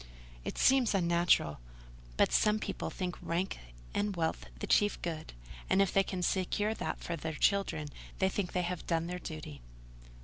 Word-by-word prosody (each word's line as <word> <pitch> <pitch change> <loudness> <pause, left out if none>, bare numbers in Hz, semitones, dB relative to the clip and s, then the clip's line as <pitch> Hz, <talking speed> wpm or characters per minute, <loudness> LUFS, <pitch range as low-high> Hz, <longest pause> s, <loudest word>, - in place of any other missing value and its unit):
"It - - -5
seems 255 -5 +4
unnatural: 170 - +3 0.6
but - - +4
some 210 0 +4
people - - -3
think 180 -2 -4
rank 175 +3 -1 0.3
and 205 -1 0
wealth 160 - -1
the - - -4
chief 205 0 +3
good; 160 -2 -4 0.4
and, - - +4
if 195 -2 +3
they 195 - +6
can 185 -1 -3
secure 205 +4 +1
that - - -3
for 170 - -2
their 160 0 -4
children, 195 -5 +1 0.3
they 190 - +3
think 190 -1 -2
they 180 - +1
have 175 0 -4
done 165 -1 +1
their 180 +1 -4
duty." 155 - -7
180 Hz, 170 wpm, -32 LUFS, 165-195 Hz, 0.6 s, they